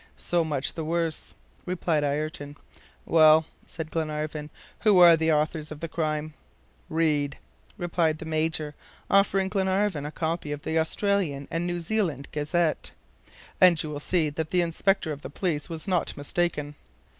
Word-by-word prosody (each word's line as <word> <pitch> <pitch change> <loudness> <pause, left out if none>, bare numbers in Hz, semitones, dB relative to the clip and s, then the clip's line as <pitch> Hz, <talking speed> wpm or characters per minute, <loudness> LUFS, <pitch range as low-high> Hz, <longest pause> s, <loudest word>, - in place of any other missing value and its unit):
"So 175 -1 0
much 150 -4 -1
the 165 - -4
worse," 165 0 -2 0.3
replied 170 -4 0
Ayrton. 145 0 -3 0.5
"Well," 155 -1 +6 0.2
said 160 -1 -7
Glenarvan, 155 -1 -3 0.3
"who 210 -3 +4
are 175 -2 +9
the 160 0 +1
authors 155 0 0
of 155 - -7
the 165 - -4
crime?" 155 -1 -2 0.6
"Read," 150 -3 +1 0.4
replied 170 -2 0
the 160 - -8
Major, 155 -1 -1 0.4
offering 195 -1 +4
Glenarvan 190 -5 0
a - - -6
copy 160 -1 -3
of 145 0 -5
the 160 0 0
Australian 160 -4 0
and 170 +1 -1
New 175 -1 -3
Zealand 165 - -1
Gazette, 155 +2 0 0.7
"and 180 -3 +6
you 155 - -5
will 145 - -4
see 155 0 +1
that 160 +1 -3
the 180 -1 +2
inspector 170 0 0
of 145 -1 -6
the - - -7
police 150 -1 -2
was 165 +2 -6
not 180 -5 0
mistaken." 150 0 -1
160 Hz, 155 wpm, -26 LUFS, 150-175 Hz, 0.7 s, are